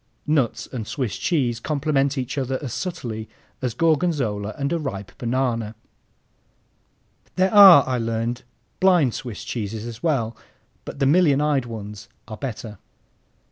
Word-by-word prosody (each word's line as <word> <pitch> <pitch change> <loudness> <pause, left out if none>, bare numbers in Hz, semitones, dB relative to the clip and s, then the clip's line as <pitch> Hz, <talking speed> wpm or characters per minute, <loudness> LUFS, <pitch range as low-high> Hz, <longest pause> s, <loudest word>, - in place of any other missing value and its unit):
(Nuts 150 -6 0
and 115 -5 -5
Swiss 125 -9 -3
cheese 125 -9 0
complement 140 0 0
each 130 +2 -3
other 135 -1 -1
as 130 - -4
subtly 120 - -5 0.3
as 125 -3 -2
Gorgonzola 140 - 0
and 140 +2 -1
a 170 - 0
ripe 100 -10 -5
banana.) 120 -3 -1 1.6
There 185 +2 +2
are, 195 -8 +9
I 130 -1 0
learned, 115 +2 -2 0.4
"blind" 175 -10 +4
Swiss 120 -5 -6
cheeses 110 -1 -4
as 115 -1 -8
well, 120 -9 0 0.5
but - - -8
the 140 - +1
million 145 -1 +4
eyed 145 -4 +1
ones 105 -1 -8 0.2
are 110 - -7
better. 110 -5 -6
130 Hz, 140 wpm, -23 LUFS, 115-150 Hz, 1.6 s, are